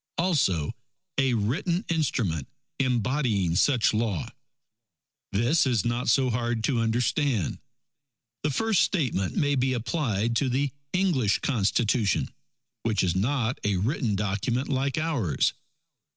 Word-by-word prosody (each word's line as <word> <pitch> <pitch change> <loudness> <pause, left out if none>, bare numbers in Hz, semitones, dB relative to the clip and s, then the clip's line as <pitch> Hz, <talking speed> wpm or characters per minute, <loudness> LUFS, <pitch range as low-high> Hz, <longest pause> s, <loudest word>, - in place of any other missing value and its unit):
"Also 140 - +1 0.5
a 130 -3 +2
written 170 - -1
instrument 115 - -1 0.3
embodying 120 - +1
such 120 +3 +3
law." 105 -7 -1 1.0
This 130 +10 +2
is 120 -6 +1
not 120 +1 0
so 130 +1 +3
hard 120 -1 -1
to 120 0 +1
understand: 115 - 0 0.8
The 150 - 0
first 220 +7 +2
statement 125 - 0
may 145 -1 +2
be 130 -1 +1
applied 115 - -1
to 130 +2 +1
the 135 +2 0 0.2
English 160 - +2
Constitution, 110 - +1 0.5
which 110 -4 0
is 90 -2 +1
not 120 +4 0
a 105 -1 +1
written 110 +1 0
Document 105 +6 -1
like 135 +1 0
ours. 140 - 0
120 Hz, 120 wpm, -26 LUFS, 105-140 Hz, 1.0 s, such